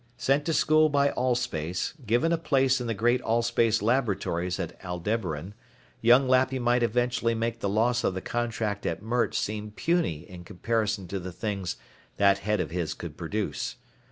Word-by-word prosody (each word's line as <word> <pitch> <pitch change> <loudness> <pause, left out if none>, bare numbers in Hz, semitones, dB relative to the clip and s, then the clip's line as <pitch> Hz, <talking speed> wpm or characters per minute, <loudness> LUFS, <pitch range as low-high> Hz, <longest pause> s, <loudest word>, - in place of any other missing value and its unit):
Sent 135 +4 +2
to 165 - 0
school 155 0 +4
by 140 -1 +3
Allspace, 120 -10 -1
given 120 +9 +2
a 170 - +3
place 135 -4 +2
in 120 - -3
the 115 - -1
great 120 +4 +2
Allspace 115 -1 +1
laboratories 100 -7 0
at 85 -3 -4
Aldebaran, 90 -1 -3 0.5
young 125 +3 +5
Lappy 130 +1 +3
might 120 0 +2
eventually 120 0 +1
make 115 +1 -2
the 100 - -1
loss 115 +4 +2
of 95 - 0
the - - -2
contract 110 -1 -2
at - - -3
Mert 120 +2 0
seem 105 0 -2
puny 105 - -1
in 90 -2 -10
comparison 105 +1 -2
to 100 - -3
the 90 0 -6
things 100 -2 -3 0.4
that 100 0 +4
head 105 +1 0
of 80 -4 -2
his 85 -3 -2
could 85 -4 -8
produce. 100 +6 -3
115 Hz, 170 wpm, -27 LUFS, 95-125 Hz, 0.5 s, young